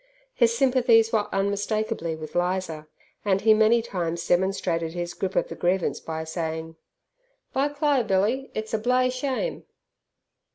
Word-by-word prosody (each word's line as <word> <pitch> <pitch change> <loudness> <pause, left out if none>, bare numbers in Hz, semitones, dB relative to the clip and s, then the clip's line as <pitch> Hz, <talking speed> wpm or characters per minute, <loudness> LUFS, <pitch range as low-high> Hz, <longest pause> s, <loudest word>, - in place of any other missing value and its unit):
His 235 - +2
sympathies 240 -4 +4
were 210 -2 +2
unmistakably 200 -2 -1
with 155 0 -9
Lizer, 175 -3 -1 0.4
and 195 -2 +1
he 220 0 +6
many 220 +2 +4
times 170 -6 -3
demonstrated 175 -3 0
his 175 0 -4
grip 190 +1 -3
of - - +1
the - - -7
grievance 180 +1 0
by 160 0 -5
saying, 160 0 -4 0.8
"By 275 +2 +2
Cli' 290 -2 +1
Billy, 215 +6 0
it's 215 +1 -4
a 220 - +1
bloo'y 250 +2 +2
shame!" 265 - -3
200 Hz, 140 wpm, -25 LUFS, 175-235 Hz, 0.8 s, he